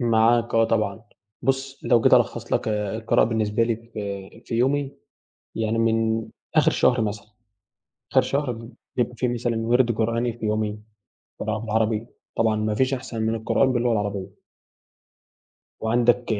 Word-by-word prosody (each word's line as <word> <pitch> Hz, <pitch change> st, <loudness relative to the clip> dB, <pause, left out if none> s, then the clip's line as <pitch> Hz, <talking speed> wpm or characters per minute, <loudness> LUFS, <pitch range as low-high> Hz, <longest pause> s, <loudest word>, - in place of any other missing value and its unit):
معاك 115 Hz, 0 st, +3 dB
آه 115 Hz, 0 st, +5 dB
طبعًا، 110 Hz, -1 st, 0 dB, 0.4 s
بُص 135 Hz, +1 st, -1 dB
لو 120 Hz, 0 st, +4 dB
جيت -, -, +6 dB
ألخص -, -, +1 dB
لك -, -, +1 dB
آآ 105 Hz, -1 st, -1 dB
القراءة 115 Hz, 0 st, +3 dB
بالنسبة 110 Hz, -1 st, 0 dB
لي 115 Hz, -1 st, +1 dB
في 100 Hz, -4 st, -7 dB
في -, -, -5 dB
يومي 135 Hz, +3 st, +1 dB, 0.6 s
يعني 115 Hz, 0 st, -1 dB
من 115 Hz, 0 st, +1 dB, 0.3 s
آخر -, -, +5 dB
شهر 125 Hz, -1 st, +3 dB
مثلًا 105 Hz, -1 st, -3 dB, 0.9 s
آخر 130 Hz, -, +5 dB
شهر 140 Hz, +1 st, -1 dB, 0.4 s
بيبقى 125 Hz, 0 st, 0 dB
في 125 Hz, -, 0 dB
مثلًا 120 Hz, -1 st, -1 dB
وِرد 120 Hz, +2 st, +2 dB
قرآني 115 Hz, +1 st, 0 dB
في 115 Hz, -, -6 dB
يومي، 105 Hz, 0 st, -1 dB, 0.6 s
طبعًا 110 Hz, 0 st, -1 dB
بالعربي 110 Hz, 0 st, 0 dB, 0.3 s
طبعًا 110 Hz, -1 st, +3 dB
ما 105 Hz, 0 st, -1 dB
فيش 130 Hz, +3 st, +1 dB
أحسن 120 Hz, -3 st, -4 dB
من 110 Hz, +1 st, 0 dB
القرآن 130 Hz, +4 st, +2 dB
باللغة 120 Hz, 0 st, +1 dB
العربية. 100 Hz, -2 st, -2 dB, 1.5 s
وعندك 120 Hz, +2 st, +2 dB
115 Hz, 145 wpm, -24 LUFS, 110-120 Hz, 1.5 s, جيت